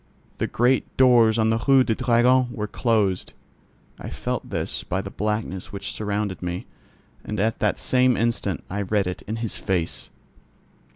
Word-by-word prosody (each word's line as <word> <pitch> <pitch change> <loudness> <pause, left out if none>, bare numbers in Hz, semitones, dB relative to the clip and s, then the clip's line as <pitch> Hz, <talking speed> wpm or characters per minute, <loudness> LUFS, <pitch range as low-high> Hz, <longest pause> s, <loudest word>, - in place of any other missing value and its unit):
The - - 0
great 125 +3 +1
doors 120 -4 +5
on 110 0 +3
the 115 0 0
Rue 135 -1 +6
du 115 - +1
Dragon 125 +2 +3
were 105 - -3
closed. 105 -4 0 0.7
I - - -6
felt - - -4
this - - -3
by 90 +2 -2
the 95 0 -6
blackness 105 -3 -3
which 100 - -4
surrounded 105 -2 -3
me, 90 0 -4 0.6
and 105 -1 -4
at 110 +3 0
the 105 - +1
same 125 -1 +2
instant 115 -5 -1
I 100 +2 -3
read 100 0 +1
it 90 0 -4
in 110 - -2
his 115 -2 -3
face. 90 -4 -2
110 Hz, 165 wpm, -24 LUFS, 100-120 Hz, 0.7 s, Rue